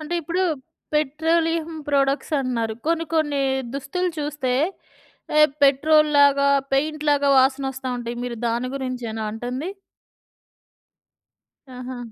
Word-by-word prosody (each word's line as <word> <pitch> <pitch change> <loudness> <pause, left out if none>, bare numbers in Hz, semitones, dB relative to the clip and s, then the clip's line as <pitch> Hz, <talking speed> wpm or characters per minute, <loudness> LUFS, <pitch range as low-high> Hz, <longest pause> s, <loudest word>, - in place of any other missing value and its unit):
అంటే 310 +3 -4
ఇప్పుడు 340 +4 -1 0.5
petroleum 320 +2 +1 0.2
products 275 +2 +1
అంటున్నారు. 235 -4 -1
కొన్ని 330 0 +1
కొన్ని 295 -3 +1 0.3
దుస్తులు 355 +7 -2
చూస్తే 290 -3 -2 0.9
ఎ - - +8 0.2
పెట్రోల్‌లాగా, 285 0 +5 0.2
పెయింట్‌లాగా 295 0 +1
వాసనోస్తా 265 0 +1
ఉంటాయి. 240 0 -5
మీరు 240 -1 -4
దాని 235 +2 -1
గురించేనా 245 -4 -4
అంటుంది? 250 - -4 2.1
ఆహా! 250 0 -7
280 Hz, 95 wpm, -23 LUFS, 255-305 Hz, 2.1 s, ఎ